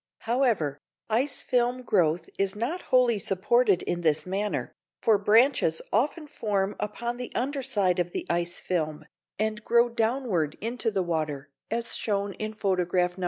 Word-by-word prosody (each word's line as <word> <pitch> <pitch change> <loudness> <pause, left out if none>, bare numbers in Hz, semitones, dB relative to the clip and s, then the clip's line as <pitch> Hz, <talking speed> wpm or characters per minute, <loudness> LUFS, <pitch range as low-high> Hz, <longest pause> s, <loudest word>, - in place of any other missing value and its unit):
However, 225 - +1 0.3
ice 255 +5 0
film 250 0 +1
growth 175 -7 +2
is 195 0 +1
not 255 - -2
wholly 245 -4 +4
supported 200 +2 +2
in 175 - -2
this 155 -3 +1
manner, 200 +3 -2 0.3
for 215 -3 +3
branches 215 - +4
often 295 - +1
form 205 -9 -1
upon 235 +3 -3
the 250 0 -6
under 275 +2 -1
side 200 -9 +1
of 175 0 0
the - - -4
ice 175 0 -1
film, 155 -3 -2 0.3
and 215 +1 -1
grow 235 +1 +4
downward 225 - 0
into 230 +1 -1
the 195 -3 0
water, 150 -4 -3 0.2
as 235 +1 0
shown 200 -2 -1
in 215 +2 -5
photograph 180 -3 +1
No. - - -12
210 Hz, 155 wpm, -27 LUFS, 180-240 Hz, 0.3 s, wholly